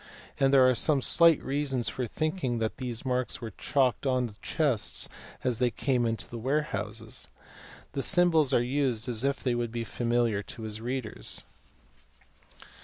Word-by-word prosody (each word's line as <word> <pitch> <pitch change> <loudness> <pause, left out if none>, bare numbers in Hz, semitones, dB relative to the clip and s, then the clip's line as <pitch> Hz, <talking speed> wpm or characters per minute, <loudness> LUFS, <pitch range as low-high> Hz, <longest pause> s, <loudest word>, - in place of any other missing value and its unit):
and 135 -1 +4
there 130 -2 +6
are 130 - +4
some 145 +3 +2
slight 165 +3 +5
reasons 135 -3 -1
for 125 -2 -3
thinking 155 - -2
that 110 -1 -2
these 125 -1 -4
marks 125 -1 -1
were 115 -2 -6
chalked 135 +5 0
on 130 -1 +2
to 115 - -7
the 105 - -26
chests 140 -9 0 0.4
as 125 -3 0
they 125 -1 +3
came 125 -1 0
into 115 0 -2
the 120 - -7
warehouses. 110 -5 -3 0.6
The 140 - -2
symbols 165 -5 +4
are 120 - +3
used 125 -3 0
as 120 -1 +1
if 140 0 -1
they 125 - +1
would 120 -1 -2
be 120 0 -3
familiar 120 -2 0
to 110 - -8
his 110 0 -5
readers. 120 - 0
125 Hz, 170 wpm, -28 LUFS, 115-135 Hz, 0.6 s, there